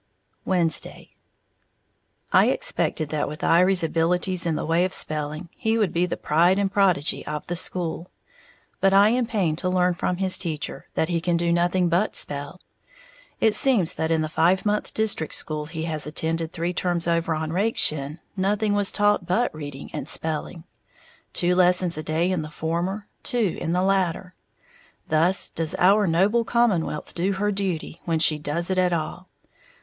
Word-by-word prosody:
Wednesday. 170 -4 -1 1.2
I - - +6
expected 155 -2 -1
that 150 -1 -1
with 150 +1 -7
Iry's 180 +2 +4
abilities 175 +2 0
in 165 - 0
the 155 - -3
way 165 +2 +2
of 185 0 -1
spelling, 155 +3 -2
he 225 +1 0
would 210 -6 +1
be 175 +1 +1
the - - -3
pride 170 +5 +3
and 200 -1 0
prodigy 190 -7 +1
of 150 0 -4
the 175 - -3
school; 175 -1 -3 0.7
but 195 0 +3
I 200 +2 +6
am 245 0 +1
pained 185 -9 0
to 185 - 0
learn 180 -1 +2
from 175 +1 -2
his 190 0 +1
teacher 160 -2 -5
that 160 - 0
he 170 -2 0
can 175 0 +1
do 170 0 +1
nothing 175 +1 +2
but 180 +5 +1
spell. 145 +5 -4 0.8
It 220 - +3
seems 210 -6 +3
that 160 - -2
in 160 -1 +1
the - - -2
five 175 +5 +2
month 210 0 0
district 210 -8 -1
school 150 -1 -4
he 160 0 -5
has 155 -2 -2
attended 160 +1 -3
three 175 +1 -3
terms 175 -2 -1
over 170 -1 +1
on 155 0 -3
Rakeshin, 155 -7 0 0.2
nothing 205 +2 0
was 205 -1 +1
taught 205 -3 +1
but 225 +7 +1
reading 145 -3 -8
and - - -2
spelling, 160 +2 -3 0.7
two 175 0 +2
lessons 180 -1 +3
a 155 - -4
day 160 +4 0
in 180 -4 0
the 155 - -7
former, 170 +6 -3 0.2
two 235 - 0
in 165 - -2
the 180 +1 +1
latter, 190 -1 0 0.8
thus 165 +4 +2
does 160 -1 -2
our 200 +3 +4
noble 195 +8 +2
commonwealth 215 -11 0
do 185 +3 0
her 205 +2 0
duty 185 -5 -3
when 165 -2 0
she 155 -1 +3
does 160 +5 -2
it 185 - +1
at 180 -1 +2
all! 170 +3 -4
175 Hz, 175 wpm, -24 LUFS, 160-190 Hz, 1.2 s, I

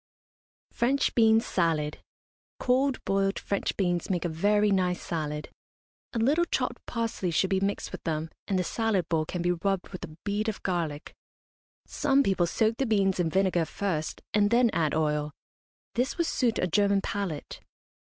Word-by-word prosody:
FRENCH 260 +4 +1
BEAN 225 -1 +5
SALAD. 165 -8 0 0.6
Cold 260 +2 +1
boiled 195 0 +1
French 200 - -2
beans 175 -3 0
make 180 -2 0
a - - 0
very 205 +6 +2
nice 180 -2 +1
salad. 150 -2 -4 0.6
A - - -2
little 285 +10 +3
chopped - - -2
parsley 230 -5 -2
should 185 +3 +1
be 190 - +3
mixed 200 +1 -2
with - - -7
them, 160 -1 -2 0.2
and 195 - +1
the 180 - +1
salad 205 -3 0
bowl 160 -2 +1
can 175 +2 -4
be 175 - +2
rubbed 190 +2 -1
with 185 - -8
a 155 -3 -9
bead 210 +2 -1
of 215 - -6
garlic. 165 -5 -2 0.7
Some 280 -1 +2
people 190 -6 +2
soak 220 +5 +1
the 270 - 0
beans 195 -4 +2
in 170 -2 +2
vinegar 185 -1 +2
first, 160 -2 -3
and 205 -1 +4
then 235 0 +4
add 155 -2 0
oil. 150 -1 0 0.6
This 250 +3 -1
would 340 - +1
suit 245 -7 +1
a - - +1
German 200 +2 +2
palate. 195 -7 -4
195 Hz, 170 wpm, -28 LUFS, 170-220 Hz, 0.7 s, BEAN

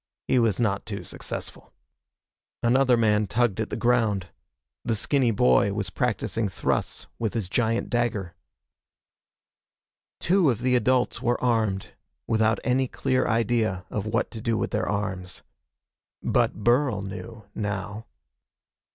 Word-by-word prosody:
He 130 - +3
was 115 -4 +2
not 105 -2 0
too 100 -2 -5
successful. - - -7 0.9
Another 125 +1 +4
man 105 -2 +2
tugged 110 0 +1
at 110 - -3
the - - -3
ground. 110 -7 +1 0.5
The 115 - 0
skinny 130 +3 +2
boy 95 - +3
was 100 -4 -3
practicing 115 -2 -1
thrusts - - -1
with 115 0 -2
his 110 -6 -1
giant 115 +3 0
dagger. 110 -7 -1 1.9
Two 180 -3 +3
of 120 -3 -1
the 125 0 +2
adults 125 0 +2
were 120 +1 +1
armed, 110 -6 0 0.4
without 110 -1 +2
any 130 +1 +2
clear 130 +1 0
idea 110 -5 +1
of 105 0 -3
what 115 +3 0
to 110 - -7
do 115 0 0
with - - -2
their - - -1
arms. 100 -3 -3 0.8
But 105 - +1
Burl 120 -3 +2
knew, 110 +2 -8
now. 105 +1 -4
110 Hz, 135 wpm, -26 LUFS, 100-120 Hz, 1.9 s, Another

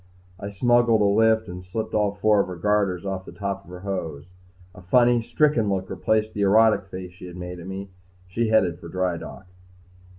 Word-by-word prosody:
I 100 - -5
smuggled 120 +2 +3
a - - +4
lift 110 +2 +3
and 90 +1 -8
slipped 110 +4 -5
all 105 -1 +1
four 105 0 +3
of - - +1
her 90 - -6
garters 100 -1 0
off 95 -1 -3
the - - -11
tops 100 -1 -5
of - - -16
her 90 0 -9
hose. 85 -7 -4 0.5
A 90 - -13
funny, 120 +5 +3
stricken 120 -3 +1
look 95 -1 -2
replaced 110 +3 0
the 105 - -3
erotic 105 0 +4
face 95 -1 -8
she 90 0 -11
had 90 0 -10
made 90 0 -7
at 85 - -9
me. 95 0 -7 0.4
She 115 +5 -1
headed 95 -7 +2
for - - -10
dry 90 0 -1
dock. 95 - -10
100 Hz, 205 wpm, -24 LUFS, 90-110 Hz, 0.5 s, a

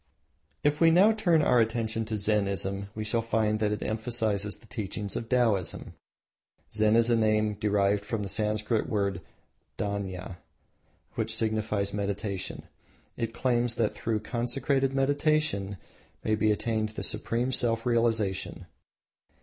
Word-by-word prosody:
If 145 +2 +1
now 170 +5 +6
we - - +3
turn 175 -8 +3
our 125 - +4
attention 115 0 0
to 110 0 -3
Zennism 100 -2 0
we 110 - -3
shall 115 +2 0
find 110 -1 0
that 105 -1 +1
it 105 - -2
emphasises 110 -2 -1
the - - -20
teachings 105 -2 -5
of 115 - -4
Taoism. 115 - +1 0.8
Zen 110 0 +3
is 115 +1 +4
a - - +5
name 110 -1 +2
derived 100 -1 +1
from 110 0 -3
the - - -3
Sanscrit 105 +2 0
word 100 -4 -1 0.6
Dhyana, 95 -3 -4 0.8
which 110 -1 -1
signifies 110 -3 0
meditation. 100 -1 -3 0.5
It 115 -1 -2
claims 120 -2 +1
that 110 -3 +1
through 110 -2 -2
consecrated 135 +4 0
meditation 140 -8 +1 0.5
may 110 - +1
be 110 0 +2
attained 110 0 -1 0.2
supreme 115 +3 -1
self 115 -2 +1
realisation. 115 -5 0
110 Hz, 135 wpm, -28 LUFS, 105-120 Hz, 0.8 s, now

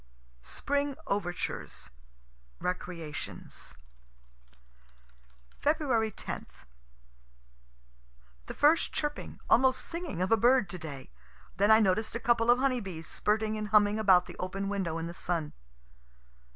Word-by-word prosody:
SPRING 285 - -1
OVERTURES 175 -3 -3 0.7
RECREATIONS 165 - -5 1.9
Feb. 260 -8 +1
10. - - -5 2.0
The - - -5
first 305 +3 +4
chirping, 295 -1 -3
almost 260 +1 +4
singing, 330 - -3
of 185 - -2
a 225 - +6
bird 240 -2 +4
to 180 - -6
day. 140 - -8 0.5
Then 200 +2 +3
I 220 0 +8
noticed 215 +2 +1
a - - -1
couple 235 -1 +2
of 240 - +7
honey 260 -1 +1
bees 175 -5 -7
spirting 215 +3 0
and 210 - -3
humming 210 0 +4
about 190 -4 +5
the - - -10
open 195 +2 -3
window 190 -5 -2
in 165 - -3
the 170 - -6
sun. 170 -3 -2
210 Hz, 120 wpm, -30 LUFS, 180-245 Hz, 2.0 s, I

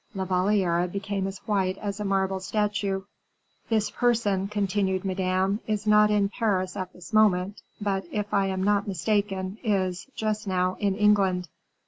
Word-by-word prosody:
La 190 -1 -2
Valliere 185 -2 +2
became 200 +1 -3
as 195 0 -5
white 190 -3 0
as 205 0 -4
a - - -2
marble 195 -1 0
statue. 200 -1 -1 0.7
"This 220 -2 +1
person," 215 -6 +1
continued 200 -2 -1
Madame, 190 +1 0
"is 215 -1 -1
not 210 0 +5
in 205 -1 +3
Paris 200 -4 -1
at 185 -2 -4
this 180 +5 -13
moment; 205 -2 +3 0.2
but, 195 -2 -1
if 210 -1 -3
I 195 -1 +3
am 190 -1 -2
not 205 0 +2
mistaken, 195 +1 -1
is, 190 -4 0
just 215 -1 -2
now, 185 -1 +1
in 200 -2 +1
England." 195 -4 +2
195 Hz, 155 wpm, -26 LUFS, 185-210 Hz, 0.7 s, not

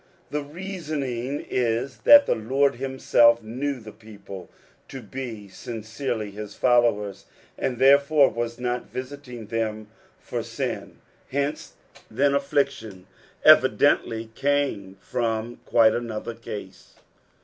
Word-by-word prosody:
The 150 - -1
reasoning 145 -6 -4
is 120 +1 -1
that 285 -1 +9
the - - +2
Lord 135 +6 +1
hjm»etf 120 -3 +3
knew 130 +5 -3
the 110 -2 -11
people 100 -3 -11 0.4
to 135 - -8
be 115 -2 -7
sincerely 110 +2 -5
his 105 0 -8
followers, 115 -5 +2 0.3
and 125 -2 -2
tOErefure 140 +2 +5
was 115 0 -3
not 125 0 -3
visiting 130 -3 -7
them 110 -1 -3 0.3
for - - -4
sin; - - -5 0.3
hence, 140 +2 -2 0.4
then, 140 +5 +2
affliction 140 -9 -1 0.4
evidently 115 0 +4
came 135 -9 -1
from 115 +1 -2
quite 110 -2 +5
anuthcr 115 0 -5
cause. 95 -2 -9
120 Hz, 110 wpm, -25 LUFS, 110-140 Hz, 0.4 s, that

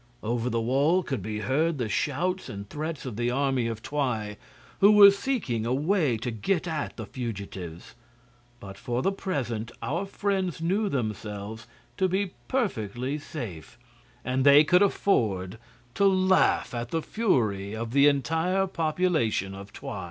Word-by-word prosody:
Over 120 +2 -1
the 115 -1 0
wall 140 +10 +2
could 135 -9 -3
be 105 +2 -4
heard 155 +6 +1
the 120 -4 -1
shouts 175 - -1
and 100 0 -7
threats 155 +4 -5
of 120 -5 -5
the 120 0 0
army 130 -2 +1
of 115 -1 -5
Twi, 125 -7 -2 0.4
who 200 +2 +7
were 200 -1 +10
seeking 200 - -2
a 120 +3 0
way 150 - +1
to 120 +2 -4
get 155 - -1
at 155 -3 -3
the 110 - -5
fugitives; 100 -8 -7 0.7
but 95 0 -10
for 120 +1 -2
the 195 - +2
present 120 - -3
our 170 +7 -2
friends 195 -4 -1
knew 195 +6 0
themselves 110 - -4 0.3
to 190 - +2
be 190 0 -1 0.2
perfectly 135 - -2
safe, 110 - -8 0.5
and 130 +1 0
they 140 +2 +8
could 180 +4 +4
afford 110 - +1 0.3
to 200 - +2
laugh 185 -6 +3
at 120 0 -4
the 165 -1 -2
fury 110 - 0
of 115 +1 -4
the 140 +2 +5
entire 160 +7 +1
population 155 - 0
of 100 +1 -10
Twi. 105 - -7
135 Hz, 155 wpm, -27 LUFS, 110-180 Hz, 0.7 s, were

